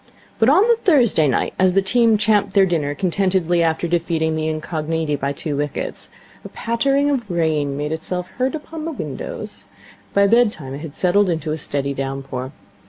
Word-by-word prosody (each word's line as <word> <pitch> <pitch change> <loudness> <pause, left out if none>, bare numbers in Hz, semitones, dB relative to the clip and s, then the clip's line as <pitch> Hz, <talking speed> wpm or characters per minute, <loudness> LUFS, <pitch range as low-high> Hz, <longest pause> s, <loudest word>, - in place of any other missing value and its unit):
But 225 - +5
on 340 +8 +6
the 470 -1 +4
Thursday 245 - +3
night, 130 - 0
as 185 -1 +4
the 195 - +4
team 230 +2 +3
champed 210 -1 +2
their 195 -1 +6
dinner 150 -5 -1
contentedly 185 -2 +1
after 165 +1 +1
defeating 165 -2 0
the 155 0 -1
Incogniti 155 0 -2
by 140 0 -2
two 145 +1 -4
wickets, 145 0 -3 0.3
a - - -8
pattering 275 +5 +1
of 240 -7 -2
rain 155 -5 0
made 150 +1 -3
itself 180 +3 -3
heard 260 +4 +1
upon 315 +1 -7
the 330 - -3
windows. - - -6 0.5
By 200 0 +5
bedtime 210 - +2
it 140 - -6
had 155 -2 -8
settled 180 -2 +2
to 155 0 -4
a 155 - -1
steady 140 -1 -2
downpour. 135 -1 -4
170 Hz, 175 wpm, -20 LUFS, 150-220 Hz, 0.5 s, on